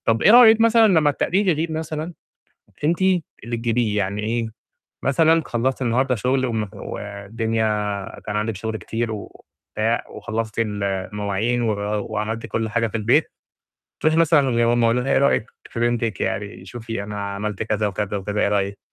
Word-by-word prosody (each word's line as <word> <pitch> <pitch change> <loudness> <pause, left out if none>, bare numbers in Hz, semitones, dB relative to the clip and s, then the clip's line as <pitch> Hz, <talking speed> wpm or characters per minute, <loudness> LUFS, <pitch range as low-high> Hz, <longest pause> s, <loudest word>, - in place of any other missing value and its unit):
طب 115 0 +2
إيه - - +6
رأيِك 225 -1 +8
مثلًا 230 0 +6
لمّا 160 -6 +4
التقدير 190 +7 0
يغيب 165 -1 +1
مثلًا، 160 +1 -4 0.7
أنتِ 165 +4 +1 0.4
اللي 120 +1 -3
تجيبيه؟ 115 -2 0
يعني 100 +1 -1
إيه، 115 +1 -1 0.6
مثلًا 160 +4 +3
خلّصتِ 125 +3 -1
النهارده 125 +2 +1
شُغل، 130 +4 0
وم 110 -4 -2
ودنيا، 110 +3 -3 0.6
كان 105 - -3
عندِك 105 +1 -1
شُغل 110 +3 -4
كتير 115 +1 -3
وبتاع، 110 +1 -4
وخلّصتِ 110 0 -4
ال 105 -3 -1
المواعين، 100 +4 -1
و 115 -2 +1 0.4
وعملتِ 110 +2 -3
كُلّ 110 0 -2
حاجة 115 +1 +1
في 115 - -3
البيت. 105 - +2 0.7
تروحي 155 0 +2
مثلًا: 145 -7 +3
"يا 120 - +4
ماما 120 0 +3
قولي 115 +2 +2
لنا 135 - -2
إيه - - +4
رأيِك 140 -4 +2 0.2
في 115 - -5
بنتِك، 120 -2 0
يعني 100 -3 -3
شوفي 115 +1 -6
أنا 105 0 -5
عملت 105 0 -3
كذا، 105 -1 0
وكذا، 105 0 -2
وكذا، 100 +2 -2
إيه - - +3
رأيِك؟" 100 -1 -1
115 Hz, 165 wpm, -22 LUFS, 105-130 Hz, 0.7 s, رأيِك